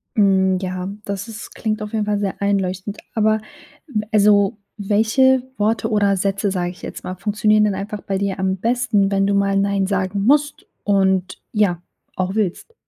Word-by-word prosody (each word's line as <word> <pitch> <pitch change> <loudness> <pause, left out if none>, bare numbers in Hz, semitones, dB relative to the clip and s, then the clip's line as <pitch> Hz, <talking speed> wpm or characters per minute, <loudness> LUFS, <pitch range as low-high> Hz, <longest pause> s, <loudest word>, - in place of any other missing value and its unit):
Mhm, 190 -2 +3
ja, 185 0 -3 0.2
das 200 +2 -4
ist 225 -1 -9
klingt 215 -1 -2
auf 210 +1 -6
jeden 215 -1 0
Fall 205 -1 0
sehr 200 -1 -3
einleuchtend. 195 0 -1 0.2
Aber 215 0 +2 0.7
also, 205 -1 +4 0.2
welche 225 +6 +3
Worte 220 +2 0
oder 205 -2 +2
Sätze, 195 +1 0
sage 180 -2 -1
ich 180 - -16
jetzt - - -7
mal, 185 - -5
funktionieren 210 +2 +2
denn 205 - 0
einfach 205 +2 -5
bei 195 - -2
dir 195 -1 -2
am 190 0 0
besten, 225 -2 +1
wenn 195 0 +2
du 200 - +1
mal 200 0 +2
Nein 195 -1 +1
sagen 195 0 -1
musst 290 +3 +2 0.2
und 190 -2 +1
ja, 195 -5 +1 0.3
auch 185 +1 -2
willst? 215 - -2
200 Hz, 170 wpm, -20 LUFS, 190-215 Hz, 0.7 s, also